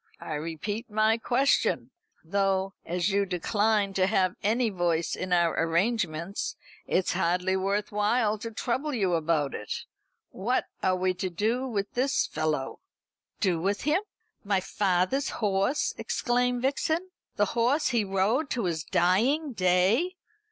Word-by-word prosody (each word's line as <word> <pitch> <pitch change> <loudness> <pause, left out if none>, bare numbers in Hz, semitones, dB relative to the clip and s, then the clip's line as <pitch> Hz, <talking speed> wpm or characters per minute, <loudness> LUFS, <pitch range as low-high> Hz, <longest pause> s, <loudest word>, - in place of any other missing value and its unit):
I 155 - -6
repeat 165 +10 -4
my 215 +2 +2
question 260 +4 +1 0.3
though, 195 +2 0
as 175 +3 -1
you 200 +1 +2
decline 205 +2 +1
to 190 -1 +2
have 190 -3 +2
any 225 +2 +1
voice 170 -3 0
in 185 0 -5
our 170 -2 +3
arrangements, 170 +1 -1 0.3
it's 185 - +1
hardly 180 +2 +1
worth 200 +2 -1
while 210 +1 +1
to 230 - -5
trouble 260 +6 -2
you 195 -6 +1
about 155 -4 +1
it 105 - -5 0.5
what 235 +7 0 0.2
are 185 - +2
we 185 0 +1
to 185 +1 -3
do 225 +9 -1
with 205 -5 -2
this 265 +3 +1
fellow?" 150 -4 -2 0.6
"Do 180 -5 +1
with 200 +3 0
him? 305 +6 +2 0.4
My 200 -2 +1
father's 190 +6 0
horse!" 200 +6 0
exclaimed 245 0 0
Vixen; 320 +7 0 0.2
"the 205 - +3
horse 245 +6 +2
he 235 -3 +2
rode 205 +9 +1
to 235 -5 -1
his 165 -3 -1
dying 250 - +2
day! 190 - +2
200 Hz, 140 wpm, -28 LUFS, 180-235 Hz, 0.6 s, our